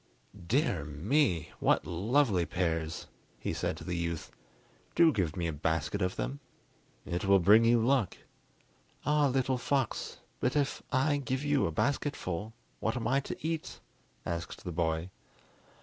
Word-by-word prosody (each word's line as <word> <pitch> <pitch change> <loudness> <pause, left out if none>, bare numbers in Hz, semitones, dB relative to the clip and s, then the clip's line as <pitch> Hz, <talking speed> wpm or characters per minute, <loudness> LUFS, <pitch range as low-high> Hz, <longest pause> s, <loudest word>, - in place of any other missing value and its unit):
"Dear 110 - +1
me; 85 - +1
what - - +3
lovely 100 - +2
pears!" 80 -2 -2 0.3
he - - -2
said - - -2
to - - -9
the 90 - -3
youth. 85 -1 -3 0.6
"Do 165 -2 +6
give 85 -7 0
me 85 - -1
a 80 - -1
basket 80 +5 -1
of 90 0 0
them. 140 - -3 0.7
It 90 +3 -2
will 100 0 +6
bring 105 +5 +6
you 120 0 +5
luck!" 130 -6 +2 0.9
"Ah, 150 0 +4
little 130 -1 +1
fox, 135 -1 -1 0.2
but 125 - 0
if 145 -2 0
I 145 +3 +2
give 130 0 -2
you 145 - +2
a - - -2
basketful, 110 - -1 0.3
what - - -1
am 115 -2 -2
I 135 +3 +3
to 140 - -6
eat?" 165 -1 -3 0.5
asked 85 +2 -4
the 90 - -4
boy. 80 +1 -1
100 Hz, 150 wpm, -31 LUFS, 85-135 Hz, 0.9 s, Do